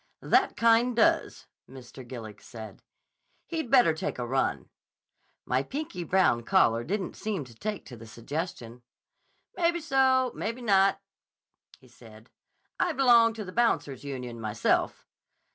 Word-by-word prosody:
'That - - +2
kind 230 +1 +3
does,' 225 - +1 0.2
Mr. 130 0 -12
Gillig 115 -4 -9
said. 110 -3 -11 0.6
'He'd 320 -7 -4
better 245 -10 +5
take 155 - -4
a 120 - -3
run.' 135 +2 -1 0.8
My 130 +1 +1
pinky 235 - -5
brown 175 -8 +2
caller 115 0 +2
didn't 190 - -3
seem 200 -9 -4
to 120 - -15
take 210 - -5
to 125 - -10
the 115 0 -12
suggestion. 120 0 -6 0.7
'Maybe 345 -1 +1
so; 265 -4 +2
maybe 230 +3 -5
not,' 195 -3 +3 0.8
he 130 - -21
said. 115 -1 -17 0.5
'I 350 - +1
belong 235 -4 +5
to 215 -2 -6
the 185 - -8
Bouncers' 185 - 0
Union, 125 -4 -6
myself. 110 0 -1
175 Hz, 135 wpm, -27 LUFS, -, 0.8 s, better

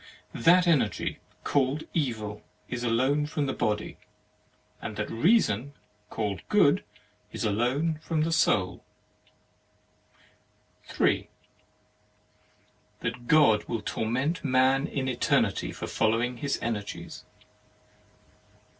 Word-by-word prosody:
That 180 +2 +5
Energy, 135 -11 +1 0.2
called 140 +2 +1
Evil, 110 -9 -2 0.3
is 125 -1 -4
alone 130 +6 +1
from 150 -1 -2
the 135 - -2
Body; 105 -1 -2 0.8
and - - -5
that - - -3
Reason, 140 - +2 0.4
called 100 -6 -3
Good, - - +4 0.5
is - - -4
alone 130 +9 0
from 160 -1 -1
the 165 - -1
Soul. 95 - +1 2.0
3. - - 0 1.7
That 120 +1 -4
God 120 -9 +5
will 115 -3 -4
torment 130 +9 -1
man 130 +1 +3
in 135 -2 -3
Eternity 125 -2 +1
for - - -6
following 115 +3 0
his 140 +3 -1
Energies. 105 -3 -5
130 Hz, 100 wpm, -27 LUFS, 110-150 Hz, 2.0 s, That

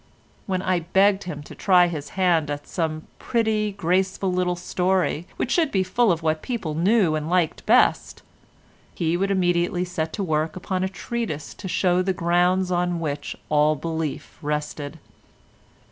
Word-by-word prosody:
When 185 -2 -1
I 185 -2 +1
begged 190 +4 +2
him 150 -5 -6
to - - -11
try 180 -2 +4
his 160 -4 -4
hand 170 -5 +2
at 145 0 -4
some 160 -3 -3 0.2
pretty, 220 -3 0
graceful, 190 0 0
little 180 -1 +1
story 180 -1 0
which 250 - -2
should 325 -4 +2
be 190 -2 +2
full 215 +4 +2
of 165 -1 -1
whatever 155 -1 0
people 220 -11 -3
knew 180 +1 +3
and 155 0 -2
liked 175 -3 +1
best, - - +3 0.7
he 165 0 0
would 195 +3 0
immediately 175 -1 +1
set 165 -3 -3
to 200 - -2
work 155 -2 -1
upon 185 0 -2
a 190 - 0
treatise 195 -5 -4
to 195 - -8
show 180 0 +2
the 190 +1 0
grounds 180 +2 +2
on 175 -1 0
which 145 -3 -4
all 150 0 +3
belief 160 -1 -4
rested. 150 0 -3
180 Hz, 160 wpm, -24 LUFS, 160-190 Hz, 0.7 s, try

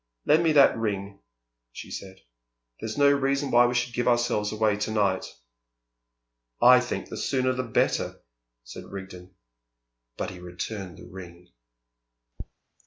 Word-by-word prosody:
"Lend 155 +3 +4
me 165 - +3
that 140 -2 +6
ring," 100 -3 -3 0.5
she - - -10
said. 95 -1 -8 0.6
"There's 110 +2 -5
no 140 0 +5
reason 140 0 0
why 120 +1 +6
we 125 - -2
should 120 0 -1
give 120 0 -1
ourselves 120 -4 +1
away 110 -1 +1
to 105 - -2
night." 100 -4 0 1.3
"I 125 +1 +8
think 125 0 -4
the - - -6
sooner 130 -1 0
the 130 - -2
better," 115 -4 0 0.4
said - - -10
Rigden. 95 -2 -10 0.8
But - - -3
he 90 - -11
returned 90 +1 -6
the - - -12
ring. 90 -2 -12
110 Hz, 140 wpm, -26 LUFS, 95-125 Hz, 1.3 s, I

